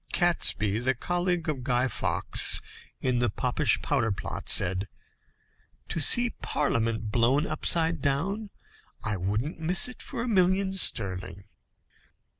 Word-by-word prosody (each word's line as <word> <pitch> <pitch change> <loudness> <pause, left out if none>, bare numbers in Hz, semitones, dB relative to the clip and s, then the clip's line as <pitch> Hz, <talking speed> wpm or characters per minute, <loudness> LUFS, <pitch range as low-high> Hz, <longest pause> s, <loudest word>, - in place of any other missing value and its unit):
Catesby, 115 - +1
the 130 +2 0
colleague 175 +4 -2
of 145 -4 -3
Guy 125 0 +1
Fawkes, 125 - -1 0.4
in 125 -2 0
the 120 -1 +1
Popish 125 +7 0
powder 120 -7 0
plot, 100 - -5
said: 95 +3 +3 1.0
"To - - -2
see 240 +9 +6
Parliament 115 -6 -2
blown 125 +7 +2
upside 165 -2 0
down, 195 +11 -2 0.6
I 110 -2 0
wouldn't 105 - -3
miss 170 +6 +4
it 250 - -9
for 235 - -4
a - - -4
million 190 -2 +2
sterling." 95 - 0
135 Hz, 125 wpm, -27 LUFS, 110-175 Hz, 1.0 s, see